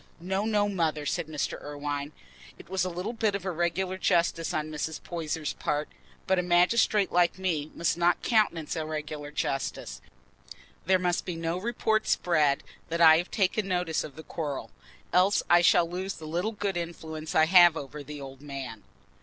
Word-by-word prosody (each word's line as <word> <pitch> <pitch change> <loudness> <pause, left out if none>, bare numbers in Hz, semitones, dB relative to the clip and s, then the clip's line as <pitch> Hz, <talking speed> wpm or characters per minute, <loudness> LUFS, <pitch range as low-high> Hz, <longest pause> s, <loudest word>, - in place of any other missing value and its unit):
"No, 190 +4 -1
no, 210 -2 +2
Mother," 160 -6 -1
said 150 - -1
Mr. 150 -3 -3
Irwine; 145 0 -4 0.5
"it - - -14
was 190 -1 0
a 185 - -1
little 180 +6 -4
bit 220 -3 0
of 195 -2 -5
irregular 185 +1 -1
justice 170 -3 +1
on 155 0 -2
Mrs. 155 +1 -3
Poyser's 160 -3 -3
part, 150 0 -2 0.4
but 190 -1 +2
a - - +3
magistrate 185 +4 +3
like 175 0 +3
me 165 -6 -1
must 170 0 0
not 175 +1 +2
countenance 190 -10 +1
irregular 155 -2 -4
justice. 135 -2 -3 0.9
There 190 0 +5
must 180 -1 0
be 180 - -4
no 165 +2 -2
report 220 0 0
spread 150 -5 +2 0.3
that 170 +1 -2
I 160 -1 +8
have 175 - -4
taken 200 0 0
notice 180 -4 0
of 140 - -9
the 160 - -9
quarrel, 150 -5 -5 0.4
else 185 +3 +4
I 175 0 +7
shall 175 0 +5
lose 185 +3 -4
the 155 - -10
little 175 +8 -2
good 200 -3 -2
influence 160 -2 -5
I 160 - +6
have 175 -1 +7
over 145 +1 -7
the 150 +1 -8
old 135 -1 -9
man." 140 -3 -7
170 Hz, 175 wpm, -28 LUFS, 155-185 Hz, 0.9 s, I